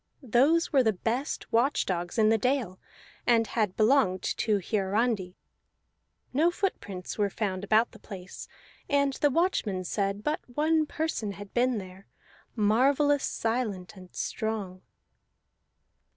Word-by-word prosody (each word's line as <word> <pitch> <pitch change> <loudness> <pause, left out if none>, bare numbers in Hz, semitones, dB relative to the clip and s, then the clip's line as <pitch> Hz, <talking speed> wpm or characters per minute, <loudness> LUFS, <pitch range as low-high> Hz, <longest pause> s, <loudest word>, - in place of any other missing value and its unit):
Those 280 +8 +3
were 270 - +6
the 220 -3 +2
best 235 +9 -3
watch 250 +5 +2
dogs 175 +2 -3
in 215 -1 +5
the 225 - +4
dales, 250 -7 -1 0.5
and 230 -2 +4
had 215 -4 -1
belonged 215 -5 +3
to 215 -2 +1
Hiarandi. 200 0 -1 1.0
No 310 +6 +4
footprints 205 - -4
were 205 -1 +2
found 195 -2 -3
about 220 +3 +3
the 220 - -15
place, 190 -3 -9 0.4
and 280 -1 +2
the 290 - +2
watchmen 260 - 0
said 200 +2 -2
but 300 - 0
one 310 +4 +1
person 300 -12 -2
had 205 0 -11
been 250 0 +2
there, 190 0 -9 0.5
marvellous 270 +7 +3
silent 225 -6 -2
and 185 -1 -13
strong. 205 -4 -4
220 Hz, 130 wpm, -28 LUFS, 195-270 Hz, 1.0 s, were